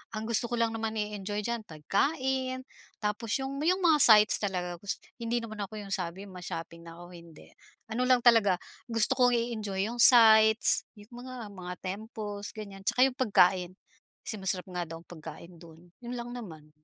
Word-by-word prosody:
ang 215 0 -5
gusto 235 +1 +4
ko - - 0
lang 230 0 +2
naman 225 -1 -4
i-enjoy 210 -1 -4
diyan 235 0 -3
pagkain 260 - -2 0.4
tapos 210 +1 -2
yung 270 +1 -5
yung 365 +3 +2
mga 325 -3 +5
sites 215 -2 +8
talaga, 180 -3 -3
gus 200 +2 -3 0.2
hindi 235 0 -2
naman 215 -2 -6
ako 215 +2 -9
yung 200 - -10
sabi 185 +2 -6
ma-shopping, 170 -2 -8
nako, 170 +1 -12
hindi. 170 -2 -15 0.4
Ano 235 +3 -2
lang 255 -1 +4
talaga, 225 -7 +4 0.3
gusto 230 -2 +2
kong 250 -1 +4
i-enjoy 215 -5 -2
yung 240 - -7
sites 220 -2 +6 0.2
yung 240 +4 -13
mga 255 -4 -8
mga 180 -3 -8
temples, 205 +1 -6
ganyan. 200 -2 -10
Tsaka 250 - +1
yung 260 - -6
pagkain, 185 -6 +2 0.6
kasi - - -2
masarap 190 -1 -3
nga 180 -1 -4
daw 165 0 -9
pagkain 165 +1 -11
do'n, 165 +1 -16 0.2
'yon 240 - -6
lang 240 0 -7
naman. 160 -11 -10
210 Hz, 170 wpm, -28 LUFS, 180-235 Hz, 0.6 s, sites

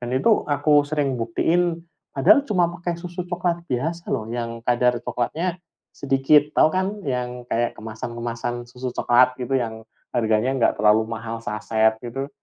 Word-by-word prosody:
Dan 120 - -5
itu 210 - +2
aku 145 0 +3
sering 140 -5 -1
buktiin 165 +8 0 0.3
Padahal 145 - +5
cuma 185 -9 +2
pakai 170 0 -4
susu 175 0 -6
coklat 175 -1 -1
biasa 160 +7 -3
loh, 110 - -1
yang 115 -1 -4
kadar 125 0 +2
coklatnya 165 +10 -2 0.4
sedikit. 140 +2 +3
Tahu - - +6
kan, 185 0 +1 0.2
yang 125 -1 -3
kayak 120 +1 0
kemasan-kemasan 120 +2 -5
susu 125 0 -6
coklat 125 +1 +4
gitu, 135 +2 0
yang 110 -3 -3 0.3
harganya 110 +1 +1
enggak 130 -3 +2
terlalu 110 +1 +3
mahal 115 0 -5
saset, 110 0 +1
gitu? 135 +4 -4
125 Hz, 150 wpm, -23 LUFS, 115-155 Hz, 0.4 s, Tahu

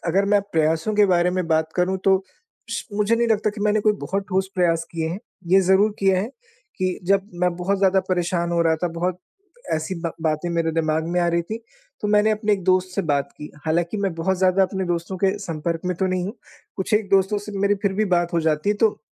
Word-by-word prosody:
अगर 195 +4 +2
मैं 205 - +5
प्रयासों 160 +5 +1
के 210 0 +5
बारे 180 -1 +3
में 185 -1 -1
बात 160 0 +1
करूँ 185 +1 +1
तो 190 -1 +4 0.5
स - - -2
मुझे 210 +2 +2
नहीं 235 0 +2
लगता 215 -1 +2
कि 210 0 -9
मैंने 210 0 +2
कोई 215 0 +3
बहुत 195 +1 -2
ठोस 190 0 0
प्रयास 165 -3 +2
किए 165 -1 -2
हैं। 175 +4 -4 0.3
ये 195 - +7
ज़रूर 190 +3 +4
किया 190 -1 +3
है 205 - -2 0.5
कि 185 -1 -1
जब 195 +1 +2
मैं 180 -1 +2
बहुत 195 +3 -1
ज़्यादा 190 0 +3
परेशान 175 -1 0
हो 170 - +2
रहा 160 -1 +2
था, 175 +2 -1
बहुत 175 +2 -2 0.6
ऐसी 160 +4 -3
बा 165 -1 -3
बातें 155 +1 0
मेरे 165 -1 0
दिमाग 160 0 0
में 180 - +2
आ 175 - +2
रही 170 0 +1
थीं, 215 +7 -5 0.4
तो 210 - -2
मैंने 210 +1 +4
अपने 210 0 +1
एक 195 -3 0
दोस्त 185 0 +3
से 200 - 0
बात 140 0 0
की। 150 - -8 0.2
हालाँकि 170 +4 0
मैं 190 -4 -1
बहुत 175 +3 0
ज़्यादा 185 +1 +3
अपने 190 0 -1
दोस्तों 175 +2 -2
के 195 +1 +1
संपर्क 165 -3 -3
में 180 -1 -1
तो 190 +2 0
नहीं 185 -1 -1
हूँ, 205 - -5 0.4
कुछ 190 +2 -1
एक 210 -1 +1
दोस्तों 195 +1 +3
से 210 - -7
मेरी 200 +1 +3
फिर 200 -2 +1
भी 210 +3 +1
बात 175 0 0
हो 170 - +2
जाती 155 +3 0
है, 210 - +2
तो 215 0 +2
185 Hz, 240 wpm, -22 LUFS, 170-200 Hz, 0.6 s, ये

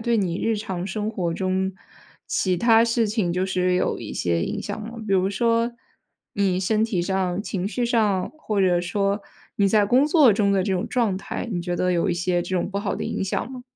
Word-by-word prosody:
对 235 0 +1
你 185 -4 -1
日 225 -1 +1
常 190 -4 -4
生 210 +2 -3
活 175 -6 -2
中 190 +1 -1 0.5
其 185 -2 0
它 230 +3 +5
事 230 -1 +1
情 205 -5 0
就 180 +2 0
是 185 -1 +1
有 180 - 0
一 - - -7
些 85 -1 0
影 - - -3
响 205 +1 -5
吗？ 230 +2 -8
比 195 - -1
如 190 0 +2
说 230 +3 +1 0.6
你 195 -2 +1
身 215 +3 +1
体 195 -6 -1
上、 190 0 -1
情 195 -3 -3
绪 245 +2 -1
上， 215 -6 +1
或 215 -9 -1
者 180 -2 +3
说 200 +3 -1 0.4
你 200 -1 +3
在 210 0 +4
工 255 +8 +4
作 300 -7 +6
中 200 0 +2
的 195 -1 +2
这 195 - -1
种 185 -1 -1
状 225 -7 +1
态， 195 - -5
你 175 - -1
觉 175 0 -3
得 180 +1 +1
有 175 +3 +1
一 175 - +1
些 175 0 0
这 185 +1 -2
种 175 - -1
不 200 - -2
好 200 -1 -2
的 - - -4
影 - - -2
响 195 +6 -2
吗？ 255 -1 -8
195 Hz, 245 characters per minute, -23 LUFS, 180-220 Hz, 0.6 s, 作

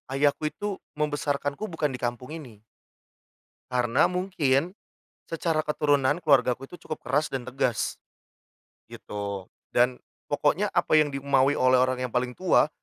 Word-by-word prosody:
ayahku 145 +2 +2
itu 200 +6 -4 0.2
membesarkanku 145 +3 -1
bukan 160 -4 -1
di 125 - -4
kampung 120 +1 -3
ini. 125 -10 -9 1.1
Karena 125 +2 +2
mungkin 180 -3 +1 0.5
secara 165 -1 -1
keturunan 145 0 +2
keluargaku 135 -3 +3
itu - - -10
cukup 155 - -7
keras 145 +4 0
dan 130 -2 -4
tegas, 125 -3 -1 0.9
gitu. 100 -2 -5 0.2
Dan 125 +1 +3 0.3
pokoknya - - +1
apa - - 0
yang 150 -1 +3
dimaui 140 0 +2
oleh 130 0 +4
orang 130 0 +2
yang 125 - -3
paling 125 0 0
tua 185 -4 +4
140 Hz, 130 wpm, -26 LUFS, 125-150 Hz, 1.1 s, oleh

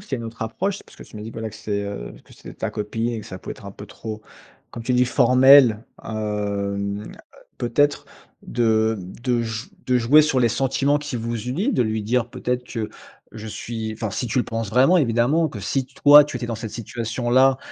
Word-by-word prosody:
C'est 135 - -4
une 115 - -6
autre 115 0 -7
approche, 190 - -2
parce - - -19
que - - -11
tu - - -13
m’as 105 - -7
dit, 110 - -7
bah 115 - -8
là, 110 - -3
que 105 - -14
c'est, 105 -2 -3
heu, - - -6
que - - -19
c'est - - -12
ta - - -3
copine 115 +3 -3
et 115 - -4
que - - -12
ça 95 - -8
pouvait - - -7
être - - -14
un - - -6
peu 100 +1 -11
trop, 110 +2 -7 0.5
comme 115 - -7
tu 125 +2 -1
dis, 125 0 +4
formel, 125 -2 +6 0.2
hem. 100 -1 -3 0.5
Peut 120 -1 -3
être 145 0 +2 0.4
de, 110 -1 +1
hem, 90 0 -9
de 120 -2 +1
j 115 +1 -5 0.2
de 125 -1 +3
jouer 140 +6 +6
sur 145 -3 +1
les 120 - +4
sentiments 135 +4 +1
qui 145 -4 -5
vous 115 0 -3
unit, 180 - -1
de - - +2
lui 110 -1 -2
dire 120 +1 0
peut-être 125 0 -2
que 115 -3 -4 0.4
je 110 0 -8
suis, 110 0 -5
enfin, 110 -1 -4
si 125 - -3
tu 130 - 0
le 125 - +2
penses 115 -2 -4
vraiment, 130 - +5
évidemment, 140 +4 +2
que 110 - -8
si 130 +6 -1
toi, 145 +2 +7
tu 145 - -6
étais 120 -1 -4
dans 115 - -3
cette 110 0 -6
situation-là, 120 +4 +1
115 Hz, 225 wpm, -22 LUFS, 110-130 Hz, 0.5 s, toi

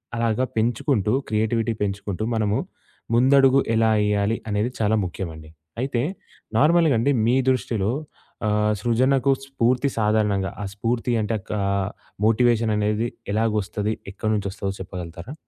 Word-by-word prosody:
అలాగా 115 +1 +1
పెంచుకుంటూ 110 -1 +1 0.2
క్రియేటివిటీ 110 +1 0
పెంచుకుంటూ, 100 0 -3
మనము 105 -2 +1 0.6
ముందడుగు 135 +2 +5 0.2
ఎలా 110 0 +3 0.2
ఎయ్యాలి? 105 +1 +1
అనేది 105 +3 0
చాలా 110 0 +2
ముఖ్యమండి. 80 -3 -7 0.3
అయితే, 130 -2 -1 0.6
నార్మల్‌గా 160 +2 +4
అండి 140 +5 +2
మీ 120 +3 +3
దృష్టిలో 110 -4 -1 0.6
ఆహ్, 105 0 +2
సృజనకు 130 +4 +2
స్ఫూర్తి 130 0 +1
సాధారణంగా 105 -3 +1
ఆ - - -3
స్ఫూర్తి 115 +4 -1
అంటే 110 +2 -1 0.2
ఆహ్, 100 -1 0 0.4
మోటివేషన్ 115 0 +3
అనేది 105 +2 0 0.3
ఎలాగొస్తది? 105 -1 0 0.2
ఎక్కడి 110 +2 -2
నుంచొస్తదదో 100 -1 -3
చెప్పగలుగుతారా? 90 - -7
110 Hz, 115 wpm, -23 LUFS, 100-120 Hz, 0.6 s, ముందడుగు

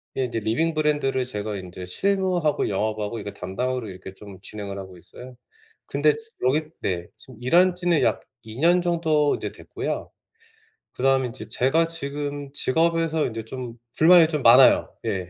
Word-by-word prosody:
이제 125 -3 -1
리빙 140 +10 0
브랜드를 145 -4 0
제가 105 -4 -4
인제 90 0 -8
실무하고 185 - 0
영업하고 105 +2 -2
이거 100 -1 -6
담당으로 120 +5 -3
이렇게 95 0 -10
좀 100 -1 -12
진행을 100 0 -7
하고 95 -2 -10
있어요. 125 +9 -13 0.5
근데 445 - +2
지 450 0 -13 0.2
여기 150 +4 +2 0.2
네. 85 -2 -2
지금 130 - -12
일한 175 +8 +4
지는 175 -3 +1
약 - - +1 0.2
2 110 +3 -10
년 175 +3 +4
정도 160 -4 +1
이제 - - -5
됐고요. - - -5 0.8
그다음에 135 -1 +1
이제 120 - -9
제가 160 +6 +2
지금 145 -3 -5
직업에서 165 +2 +1
인제 115 -2 -6
좀 120 -1 -7 0.2
불만이 165 0 +7
좀 150 -4 -3
많아요. 125 +3 +6
예. 90 -2 -2
130 Hz, 330 characters per minute, -24 LUFS, 105-160 Hz, 0.8 s, 불만이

